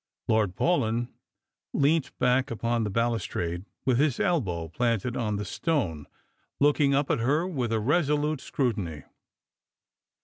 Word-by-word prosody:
Lord 105 -4 +2
Paulyn 120 - +1 0.7
leant 145 +1 +2
upon 125 -2 +1
the 105 - -1
balustrade, 100 -6 -1 0.2
with 130 -2 +3
his 145 -3 +2
elbow 90 - 0
planted 115 +5 -1
on 105 -3 -1
the 100 - -2
etone, 95 - -1 0.5
looking 145 -1 +4
up 140 0 +1
at - - +1
her 145 +9 +2
with 130 -11 -2
a 110 - +1
resolute 150 +3 +1
scrutiny. 100 - -2
120 Hz, 125 wpm, -27 LUFS, 105-145 Hz, 0.7 s, looking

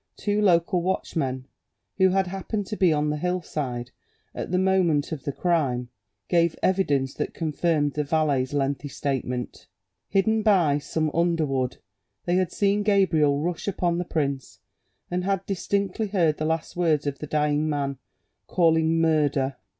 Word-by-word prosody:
Two 205 0 0
local 175 -2 +3
watch 185 +2 -2
men, 130 -4 -2 0.5
who 190 0 +6
had 190 +1 +2
happened 195 +3 -4
to 210 - -5
be 185 -4 +3
on 150 0 +1
the 150 - -2
hillside 150 -8 -3 0.4
at - - -5
the 180 - +1
moment 185 -6 +2
of 145 -5 -5
the 140 - -1
crime, 135 -7 0 0.4
gave 170 -2 +2
evidence 145 -9 +1
that - - -4
confirmed 155 -2 0
the 150 - -1
valet's 145 -4 +1
lengthy 140 0 -1
statement; 130 -3 -4 0.4
hidden 220 +3 +2
by 180 -9 +3
some 155 +1 -2
under 170 -1 +2
wood, 130 -3 -2 0.5
they 175 +1 +2
had 185 -1 0
seen 205 0 +1
Gabriel 170 -9 +3
rush 175 +3 -3
upon 175 -3 0
the - - 0
prince, 140 -5 -2 0.5
and 180 +1 -1
had 195 0 -1
distinctly 200 +2 -1
heard 170 -6 +1
the 155 - -2
last 160 0 -2
words 160 -4 +1
of 140 -1 -3
the 150 - -6
dying 150 +1 +1
man; 140 -3 -2 0.5
calling 160 -2 +3
"Murder!" 145 -4 +1
160 Hz, 160 wpm, -25 LUFS, 145-185 Hz, 0.5 s, who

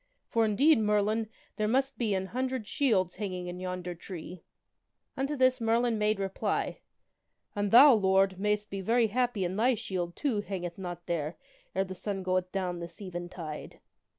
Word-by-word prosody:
For, 230 -1 +3
indeed, 270 +8 +4
Merlin, 210 +1 +1 0.3
there 215 - +1
must 265 +1 +1
be 215 -4 +1
an 190 0 -1
hundred 255 +2 -2
shields 200 -8 +1
hanging 185 -4 -4
in 180 0 -6
yonder 180 -1 -4
tree 175 0 -8 0.4
!" - - -53
Unto 275 +2 -1
this 255 -2 +3
Merlin 230 0 +2
made 210 0 +2
reply, 195 -1 -2 0.4
" - - -49
And 205 0 0
thou, 265 +6 +9
Lord, 190 -2 +3
mayst 210 0 0
be 195 0 -3
very 230 +4 +3
happy 240 -3 0
an 180 +2 -2
thy 245 +3 +3
shield, 175 -4 -3
too, 240 -8 0
hangeth 180 -3 -5
not 175 -2 -6
there 160 -1 -2 0.4
ere 190 - +2
the 190 - -6
sun 195 +1 -4
goeth 185 0 0
down 180 -3 -2
this 170 0 -8
even 175 -3 -6
tide." 155 -4 -7
200 Hz, 180 wpm, -30 LUFS, 180-225 Hz, 0.4 s, thou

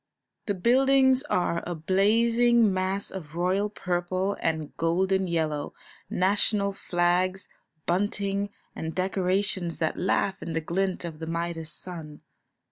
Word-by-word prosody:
The 205 - 0
buildings 265 +5 +4
are 170 -1 +1
a 175 - -3
blazing 225 +6 +3
mass 190 +2 0
of 160 -5 -8
royal 185 +4 +1
purple 185 0 -1
and 160 -2 -2
golden 190 +3 +1
yellow, 155 -4 -1 0.3
national 200 +1 +2
flags, 180 +1 0 0.4
bunting, 200 +2 0 0.3
and 160 0 -5
decorations 185 -1 0
that 160 - -1
laugh 190 +1 0
in 165 - -5
the 165 - +1
glint 185 +3 -1
of 160 -2 -7
the 160 - -5
Midas 165 -1 -2
sun. 160 -5 -5
185 Hz, 125 wpm, -27 LUFS, 170-200 Hz, 0.4 s, buildings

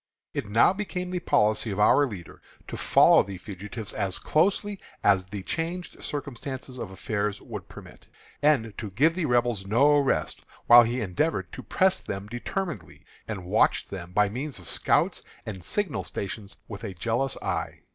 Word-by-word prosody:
It - - -3
now 115 - +5
became 185 -3 -4
the 180 - -1
policy 110 -7 +2
of 100 0 -3
our 140 +7 +5
leader 95 -9 -9 0.3
to - - -5
follow - - +6
the 100 -1 -6
fugitives 105 +3 -7
as 95 -2 -1
closely 200 +5 +1 0.2
as 95 -2 +4
the 100 0 -6
changed 170 - -4
circumstances 135 -2 -5
of 105 - -5
affairs 100 +1 -2
would - - -8
permit, - - -13 0.3
and 130 -8 +2
to 110 - -4
give 140 - +3
the 175 -2 -1
Rebels 120 -5 +1
no 140 +8 +5
rest, 140 - 0 0.2
while 120 0 +10
he 120 +2 0
endeavored 115 - -1
to - - -7
press 190 0 +2
them 100 0 -5
determinedly, 120 - -5 0.2
and 100 -5 -5
watched 90 - +2
them 90 -3 -7
by 105 +2 +3
means 130 +7 -5
of 90 - -10
scouts - - +1 0.2
and 95 -5 -6
signal 195 - -2
stations 100 +1 -6
with 105 0 -8
a 100 -4 -5
jealous 120 +8 -1
eye. - - -3
115 Hz, 165 wpm, -27 LUFS, 100-150 Hz, 0.3 s, while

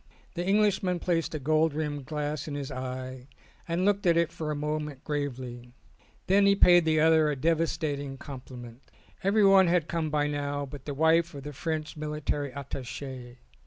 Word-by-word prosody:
The 175 - -3
Englishman 195 -2 +2
placed 170 -2 -1
a - - -2
gold 155 +2 +2
rimmed 145 -3 -3
glass 150 -1 -3
in 145 - -4
his 140 -1 -5
eye 130 0 -6 0.4
and 170 +2 0
looked 200 -2 +2
at 170 -1 +4
it 170 0 +2
for 155 -2 -5
a 150 - -1
mo 150 +1 -1
ment 150 -3 -7
gravely; 125 -5 -4 0.5
then 200 +1 +4
he 200 - +5
paid 175 -3 +6
the 155 -1 +3
other 160 -1 +5
a 150 - 0
devastating 145 -2 -1
compliment. 125 -3 -10 0.4
Everyone 195 -2 +5
had 170 -2 +2
come 165 -2 -1
by 150 -1 +1
now 145 -1 -2
but 135 0 -10
the 145 - -4
wife 160 +2 +3
of 140 - -8
the 150 +1 -7
French 155 +1 -3
Military 150 -2 -3
Attache. 130 -2 -7
150 Hz, 175 wpm, -28 LUFS, 140-165 Hz, 0.5 s, paid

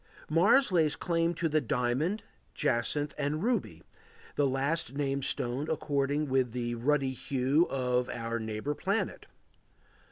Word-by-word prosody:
Mars 205 - +5
lays 160 -4 +3
claim 170 -1 0
to 165 +1 0
the 155 0 +1
diamond, 130 - 0 0.3
jacinth, 140 +5 0
and 150 +3 -1
ruby, 245 +1 -1 0.5
the 145 - +2
last 135 +1 0
named 140 -1 -1
stone 135 +3 -1
according 145 -1 0
with 130 -3 +1
the 120 -1 -2
ruddy 135 +3 +1
hue 135 +5 +1
of 125 -2 0
our 115 0 -3
neighbor 110 +5 -3
planet. 195 +8 -2
140 Hz, 130 wpm, -30 LUFS, 125-160 Hz, 0.5 s, Mars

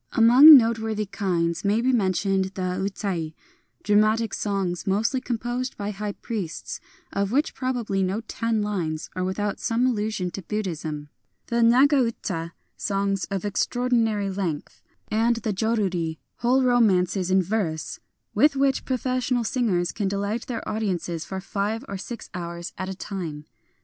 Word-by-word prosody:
Among 255 +7 +10
noteworthy 220 -2 0
kinds 180 -5 -1
may 205 +2 +2
be 255 +2 +2
mentioned 195 -2 +1
the 185 -1 -2
Utai, 190 -5 -3 0.5
dramatic 215 +1 +3
songs, 195 -2 -2
mostly 220 +7 +1
composed 240 +1 -3
by 205 0 -3
high 210 0 -4
priests, 195 -9 -5 0.3
of 200 0 0
which 290 +5 +1
probably 245 -7 -1
no 190 +4 0
ten 225 -1 -1
lines 170 -7 -3
are 185 - -1
without 200 +2 -2
some 235 +1 +1
allusion 215 -6 -1
to 195 - -6
Buddhism; 160 -7 -4 0.2
— - - -50
the 235 - +1
JV^aga 255 +4 +5
uta, 170 -7 -4 0.2
songs 195 -1 -1
often 200 - -4
of 195 - -3
extraordinary 225 -1 +1
length; 180 -6 -4 0.2
— - - -46
and 225 +2 +2
the 220 -2 -2
Joruri, 190 -6 0 0.2
whole 255 +2 +2
romances 195 -7 +3
in 190 0 +4
verse, 175 -5 -2 0.3
with 295 -1 +4
which 270 -1 +1
professional 255 -1 0
singers 200 -6 0
can 205 -2 -2
delight 200 +4 -2
their 235 -3 -4
audiences 180 -6 -2
for 190 - -5
five 205 +5 -3
or 195 - -5
six 235 +4 -7
hours 170 -1 -6
at 190 +1 -4
a 190 - -4
time. 170 -7 -6
205 Hz, 150 wpm, -25 LUFS, 185-230 Hz, 0.5 s, Among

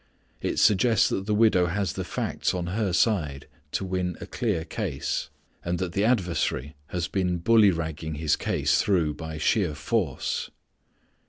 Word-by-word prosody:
It - - -2
suggests 110 +1 +4
that 95 +1 -2
the 105 - +2
widow 105 -5 +4
has 95 0 -1
the - - -3
facts - - -2
on 90 -1 -2
her 105 -2 0
side 80 -9 +1 0.3
to 95 - -1
win 90 -2 -2
a - - -6
clear 105 -10 -2
case, 80 -6 -3 0.3
and 85 +1 -1
that 95 -1 -2
the 100 +3 0
adversary 85 - 0
has 85 0 -2
been 90 -2 0
bully 110 +4 +5
ragging 80 -2 -3
his 75 0 +1
case - - +1
through 85 -7 +1
by 80 0 -7
sheer 85 0 +1
force. 80 - -1
90 Hz, 160 wpm, -26 LUFS, 80-100 Hz, 0.3 s, bully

